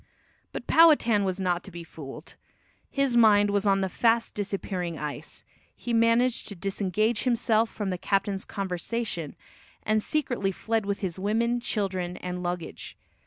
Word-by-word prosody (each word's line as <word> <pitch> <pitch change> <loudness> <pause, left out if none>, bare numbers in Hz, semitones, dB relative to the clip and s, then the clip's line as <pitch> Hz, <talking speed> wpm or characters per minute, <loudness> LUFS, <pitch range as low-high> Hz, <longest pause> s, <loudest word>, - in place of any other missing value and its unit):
But - - -6
Powhatan 265 -11 +5
was 190 0 -2
not 180 -2 0
to - - -10
be 175 -2 -8
fooled. 155 -1 -10 0.6
His 275 -3 +1
mind 205 -3 +5
was 200 0 +1
on 195 0 +3
the 190 - +1
fast 230 +4 +1
disappearing 190 -4 -3
ice. 150 +1 -6 0.3
He 240 - -4
managed 230 +2 +3
to 205 - -6
disengage 200 +4 0
himself 230 -2 +2
from 205 -3 -3
the 180 - -3
captain's 195 0 0
conversation, 190 -3 -3 0.5
and 215 0 +1
secretly 245 -8 -1
fled 220 +2 -2
with 200 0 -2
his 185 -2 -3
women, 230 +4 +1
children 190 -6 -2
and 180 0 -5
luggage. 175 -1 -5
200 Hz, 150 wpm, -27 LUFS, 180-230 Hz, 0.6 s, Powhatan